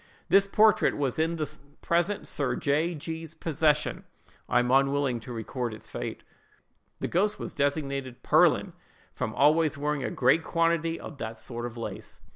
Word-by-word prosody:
This 195 +1 +5
portrait 215 0 +4
was 140 -1 -1
in 165 +1 +1
the 155 -2 -5 0.2
present 175 +4 +1
Sir 140 -3 -1
J—— 155 +4 0
G——'s 160 +1 -6
possession. 150 -1 +1 0.5
I 125 - +3
am 125 0 +2
unwilling 135 -2 +2
to 120 +2 -10
record 120 0 -4
its - - -11
fate. - - -6 0.8
"The - - -1
ghost 205 +4 +1
was - - -6
designated 140 -3 -2
'Pearlin,' - - +4 0.4
from - - -3
always 155 +1 +3
wearing 145 -1 -1
a - - -1
great 135 +6 +3
quantity 165 0 +1
of 145 - -9
that 110 0 -5
sort 120 +1 -5
of 120 0 -10
lace. 115 - -7
145 Hz, 160 wpm, -28 LUFS, 130-165 Hz, 0.8 s, This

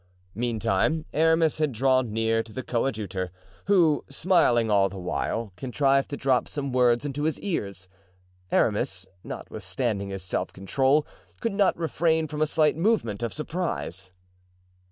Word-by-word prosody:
Meantime 115 +6 0
Aramis 160 0 +3
had 155 -2 +1
drawn 130 0 +2
near 115 +1 +1
to 115 - -12
the 130 +3 -5
coadjutor, 105 -7 -2 0.4
who, 170 -7 +4
smiling 140 - +3
all 100 -1 +4
the 95 - -9
while, 100 +3 -3
contrived 135 +4 +1
to 145 - -4
drop 130 -2 +1
some 140 -2 -3
words 125 +1 +3
into 145 0 -3
his 160 - 0
ear. 170 - -1 0.8
Aramis, 95 -3 +1 0.2
notwithstanding 105 -6 -3
his 95 -1 -4
self 95 - -2
control, 135 +10 +1 0.3
could 230 -3 -1
not 200 -1 +2
refrain 160 -1 +1
from 150 0 -5
a 155 - +4
slight 155 0 +3
movement 165 - +1
of 115 - -2
surprise. 150 - -3
130 Hz, 140 wpm, -26 LUFS, 110-155 Hz, 0.8 s, who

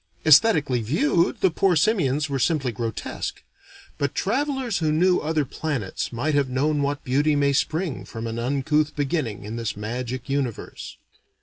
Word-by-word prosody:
Aesthetically 155 - +5
viewed, 150 +8 +1
the 190 - +4
poor 185 +2 +2
simians 155 - +2
were 140 -2 -2
simply 135 -3 +1
grotesque; 115 0 -5 0.6
but - - -1
travelers 265 -6 -1
who 155 -2 +1
knew 180 +4 +3
other 155 -1 0
planets 130 -8 -3
might 135 +6 -1
have 140 -2 +2
known 145 +3 +1
what 145 +1 -2
beauty 145 +4 +2
may 140 -1 +2
spring 160 +1 -1
from 115 -1 -7
an 115 0 -4
uncouth 145 +4 0
beginning 140 -6 -2
in 110 +3 -6
this 115 -3 -3
magic 120 +4 -4
universe. 135 -5 -4
145 Hz, 150 wpm, -24 LUFS, 125-160 Hz, 0.6 s, Aesthetically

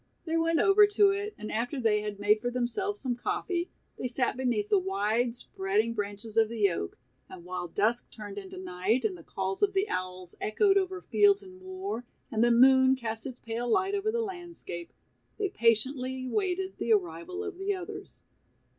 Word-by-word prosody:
They 325 -1 -1
went 330 0 +2
over 405 +1 +6
to 410 -1 +4
it, 410 +1 -3
and 215 - -6
after 245 +5 -1
they 215 -3 +2
had 210 -1 -5
made 210 +1 +3
for 245 - -1
themselves 250 - -1
some 255 -3 -1
coffee, 360 - -2 0.3
they - - -1
sat 245 0 0
beneath 240 -5 0
the 205 - +5
wide 210 +6 0
spreading 215 0 -1
branches 205 +1 -5
of 220 -1 +5
the 210 -4 +2
oak 85 - -4 0.3
and 175 -2 -11
while 180 0 -4
dusk 215 +7 0
turned 205 -2 -8
into 190 -2 -10
night 185 +6 0
and 200 -4 0
the 170 - -12
calls 190 +3 -3
of 400 -1 +3
the 390 +2 +1
owls 185 -1 -4
echoed 390 - +3
over 375 -2 0
fields 405 +1 +4
and 370 -1 -13
moor, 375 - -5 0.3
and 220 0 +2
the 240 - +5
moon 260 +2 +6
cast 225 -1 -3
its 255 -2 -7
pale 235 +1 -4
light 380 - +2
over 405 +2 0
the 465 0 0
landscape, 345 - -7 0.5
they 405 -2 0
patiently 255 - +1
waited 380 +4 -1
the - - -1
arrival 365 -1 -2
of 395 -3 -6
the 395 +1 0
others. 395 +2 -8
245 Hz, 190 wpm, -29 LUFS, -, 0.5 s, over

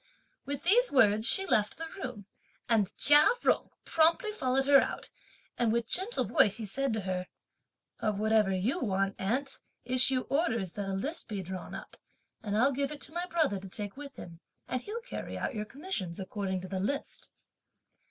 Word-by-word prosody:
With 280 0 -3
these 480 +8 +4
words, 220 -4 +4
she 385 +7 +4
left 210 - +1
the 325 - -5
room, 250 - -7 0.4
and 210 -4 +2
Chia 295 +1 +7 0.2
Jung - - +2 0.2
promptly 330 +6 +2
followed 265 -9 0
her 275 -1 +7
out, - - -5 0.5
and 235 -2 +2
with 235 0 0
gentle 390 - -1
voice 205 +1 +3
he 225 - -4
said 270 +6 -1
to 220 - -2
her: 185 -1 -3 0.7
"Of 215 -3 -1
whatever 215 -2 +3
you 205 - 0
want, 195 - 0
aunt, 250 +8 -2 0.3
issue 255 +1 +4
orders 230 - -1
that 200 +1 -5
a - - -2
list 275 - -4
be 205 -4 -4
drawn 185 +1 -7
up, - - -10 0.4
and 210 -1 -2
I'll 265 +5 +4
give 280 +1 -2
it 295 - -8
to 310 - -3
my 350 +1 -2
brother 315 - +1
to 190 0 -10
take 205 +1 -5
with 280 -1 -9
him, 165 -1 -10 0.3
and 255 - -2
he'll 440 - -6
carry - - -6
out - - -3
your 210 -2 -3
commissions 240 - -4
according 190 -1 -3
to 185 - -7
the 190 0 -3
list." 275 +9 -4
235 Hz, 185 wpm, -30 LUFS, 200-285 Hz, 0.7 s, Chia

